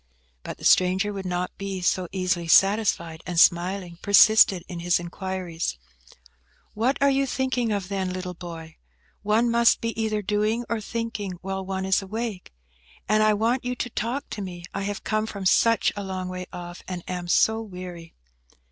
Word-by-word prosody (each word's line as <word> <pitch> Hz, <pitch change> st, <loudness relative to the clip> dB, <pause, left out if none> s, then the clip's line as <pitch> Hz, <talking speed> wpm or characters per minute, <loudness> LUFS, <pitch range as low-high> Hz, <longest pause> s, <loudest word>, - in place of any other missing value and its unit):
But -, -, -7 dB
the -, -, -9 dB
stranger 190 Hz, +3 st, +4 dB
would 195 Hz, -2 st, -5 dB
not 180 Hz, 0 st, -3 dB
be 195 Hz, -1 st, -4 dB
so 180 Hz, 0 st, 0 dB
easily 185 Hz, -3 st, -1 dB
satisfied, 190 Hz, -4 st, +3 dB
and 175 Hz, -2 st, 0 dB
smiling, 175 Hz, 0 st, +2 dB
persisted 200 Hz, -3 st, +6 dB
in 175 Hz, -3 st, -6 dB
his 175 Hz, +1 st, +2 dB
inquiries. 175 Hz, -, -4 dB, 1.0 s
"What 240 Hz, +6 st, +1 dB
are 280 Hz, -, +4 dB
you 275 Hz, 0 st, +1 dB
thinking 255 Hz, -3 st, -1 dB
of, 200 Hz, -3 st, -2 dB
then, 190 Hz, -1 st, -2 dB
little 185 Hz, 0 st, -5 dB
boy? 165 Hz, -2 st, -9 dB, 0.4 s
One 220 Hz, +3 st, +2 dB
must 235 Hz, 0 st, +4 dB
be 230 Hz, -, -2 dB
either 215 Hz, -1 st, -1 dB
doing 215 Hz, +4 st, 0 dB
or 230 Hz, -2 st, -2 dB
thinking 220 Hz, -3 st, -4 dB
while 190 Hz, 0 st, -3 dB
one 190 Hz, 0 st, -3 dB
is 190 Hz, +1 st, +2 dB
awake. 215 Hz, -1 st, -5 dB, 0.6 s
And 215 Hz, +1 st, +3 dB
I 215 Hz, 0 st, +4 dB
want 230 Hz, +5 st, 0 dB
you 250 Hz, 0 st, -2 dB
to 245 Hz, 0 st, -4 dB
talk 235 Hz, +7 st, -3 dB
to 210 Hz, -, -4 dB
me. 175 Hz, -3 st, -7 dB
I 200 Hz, -, -3 dB
have 205 Hz, 0 st, -4 dB
come 215 Hz, 0 st, -1 dB
from 200 Hz, -3 st, -6 dB
such 230 Hz, +4 st, +3 dB
a 205 Hz, -, -4 dB
long 185 Hz, -1 st, -4 dB
way 185 Hz, 0 st, -6 dB
off, 175 Hz, 0 st, -8 dB
and 180 Hz, -2 st, -5 dB
am 180 Hz, -1 st, -4 dB
so 220 Hz, +5 st, +3 dB
weary." 180 Hz, -5 st, -9 dB
195 Hz, 175 wpm, -25 LUFS, 180-220 Hz, 1.0 s, persisted